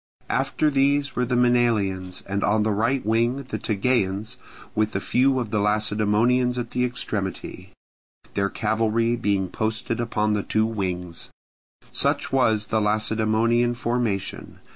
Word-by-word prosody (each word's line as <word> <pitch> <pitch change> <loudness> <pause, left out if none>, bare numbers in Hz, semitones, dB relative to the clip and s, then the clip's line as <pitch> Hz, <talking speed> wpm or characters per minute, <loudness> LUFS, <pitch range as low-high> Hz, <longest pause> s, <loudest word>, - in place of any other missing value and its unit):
After 150 - +1
these 140 0 +1
were 125 - +1
the 125 +1 -1
Maenalians, 110 -7 +1
and 100 +1 -2
on 105 +1 +2
the 110 - +1
right 115 +5 0
wing 120 +5 +1
the 130 - -5
Tegeans 110 0 -1 0.4
with 110 -1 0
a - - +1
few 130 +2 +2
of 115 -4 -4
the 105 - +1
Lacedaemonians 110 +4 +2
at 120 -1 -4
the 125 - 0
extremity; 100 -6 -4 0.6
their 100 0 0
cavalry 115 +2 0
being 100 -4 0
posted 110 +4 -3
upon 105 -2 0
the 105 - 0
two 110 +2 +1
wings. 90 -6 -4 0.6
Such - - +1
was 110 -6 +2
the 110 - +3
Lacedaemonian 110 +3 +2
formation. 120 -5 -2
110 Hz, 140 wpm, -24 LUFS, 105-120 Hz, 0.6 s, the